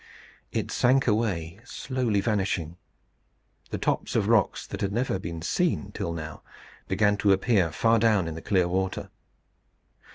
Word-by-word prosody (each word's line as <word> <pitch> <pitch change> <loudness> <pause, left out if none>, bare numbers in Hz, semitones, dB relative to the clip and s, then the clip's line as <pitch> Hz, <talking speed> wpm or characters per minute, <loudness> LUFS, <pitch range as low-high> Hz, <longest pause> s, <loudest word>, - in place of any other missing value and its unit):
It - - -2
sank 130 +2 +3
away, 100 -6 0
slowly 120 -4 -1
vanishing. 95 -6 -1 0.9
The - - -3
tops - - -1
of - - +2
rocks - - +2
that - - -7
had 100 - 0
never 115 -3 0
been 85 -2 -6
seen 150 - 0
till 85 - -3
now, 80 -1 -6 0.5
began 105 +2 +2
to 100 -1 +3
appear 95 -4 +2
far 115 +8 +3
down 105 -6 +3
in 80 - -4
the 80 - -7
clear 95 -3 +2
water. 95 +1 -2
100 Hz, 150 wpm, -27 LUFS, 85-115 Hz, 0.9 s, sank